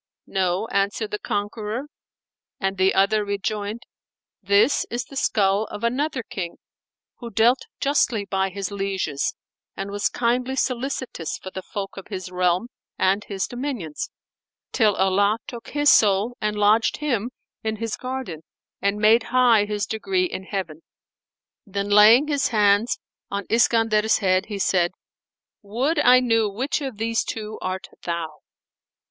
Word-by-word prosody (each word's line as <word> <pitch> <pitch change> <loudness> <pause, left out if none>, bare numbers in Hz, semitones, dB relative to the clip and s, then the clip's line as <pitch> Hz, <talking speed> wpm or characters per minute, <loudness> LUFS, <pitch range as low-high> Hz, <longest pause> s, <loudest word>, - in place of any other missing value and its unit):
"No," 190 +2 0
answered 200 +2 -1
the 210 - -3
conqueror; 210 +3 -3 0.8
and 195 0 -1
the 190 +1 +3
other 210 +2 +3
rejoined, 205 +2 -3 0.6
"This 205 +6 +3
is 240 +1 -3
the 275 - -13
skull 205 -4 +2
of 210 - -8
another 260 +2 0
King, 190 -9 -5 0.6
who 235 - -7
dealt 230 +4 +2
justly 255 -7 +1
by 195 -1 0
his 195 +1 -5
lieges 195 -8 -2 0.4
and 195 +1 -4
was 205 0 0
kindly 250 +2 0
solicitous 255 - -2
for 190 - -9
the 190 - -6
folk 195 +1 -6
of 195 - -8
his 185 -3 -6
realm 180 +4 +1 0.3
and 195 +2 +1
his 195 -2 -2
dominions, 245 - -4 0.6
till 215 -4 +3
Allah 200 +3 +2
took 235 -2 -9
his 290 0 +4
soul 210 +3 +4
and 210 0 0
lodged 210 +2 +3
him 245 -7 -1 0.3
in 220 0 -1
His 225 0 -3
Garden 255 -11 -5 0.4
and 200 +1 +1
made 220 +2 +4
high 240 -4 +4
his 205 0 -2
degree 365 - 0
in 190 - -5
Heaven." 175 -6 -4 0.8
Then 200 -2 -4
laying 220 +7 +7
his 285 -2 +1
hands 210 +1 +3 0.3
on 200 -1 -3
Iskandar's 225 -1 +3
head 185 -2 +1
he 210 -2 -4
said, 180 -2 +1 0.7
"Would 255 +10 -1
I 255 -3 +6
knew 225 -3 +2
which 255 +9 -2
of 265 -6 -5
these 225 +1 0
two 215 -1 -5
art 185 0 -3 0.2
thou." 165 -3 -4
210 Hz, 145 wpm, -23 LUFS, 195-235 Hz, 0.8 s, laying